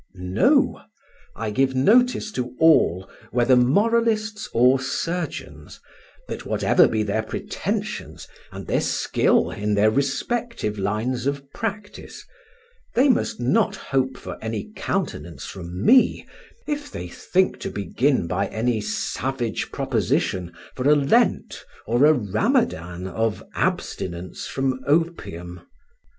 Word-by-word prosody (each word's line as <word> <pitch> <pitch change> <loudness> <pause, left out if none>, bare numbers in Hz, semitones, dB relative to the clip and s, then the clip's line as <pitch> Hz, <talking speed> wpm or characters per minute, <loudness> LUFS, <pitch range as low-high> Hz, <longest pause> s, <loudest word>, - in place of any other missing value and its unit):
No; 90 0 +2 0.5
I 110 -2 -3
give 130 +4 +1
notice 220 - +3
to 125 -7 -4
all, 95 - +4 0.2
whether 125 +1 +3
moralists 215 - +2
or 125 +3 +4
surgeons, 130 - -4 0.5
that - - -6
whatever - - +3
be 110 -1 0
their 105 +1 0
pretensions 110 - -4 0.2
and - - -2
skill - - +1
in 105 0 -1
their 105 +1 +4
respective 140 - -2
lines 115 +6 -1
of 140 0 -3
practice, 210 -2 -6 0.7
they 265 +4 +4
must 245 - +1
not 205 - +2
hope 130 -6 -1
for - - -8
any 110 -2 -4
countenance - - -3
from 90 0 -6
me, 255 +1 +5 0.4
if 290 -1 -3
they 90 - -6
think 185 - 0
to - - -4
begin 120 - 0
by 90 +4 -1
any 115 0 -1
savage 120 +3 -3
proposition 90 -2 -1 0.2
for 130 +2 0
a 150 - +7
Lent 170 - +1 0.2
or 120 +5 +3
a 155 - +7
Ramadan 105 - 0
of 110 +3 -2
abstinence 90 0 -3
from 135 -1 -1
opium. 115 - -1
130 Hz, 115 wpm, -23 LUFS, -, 0.7 s, a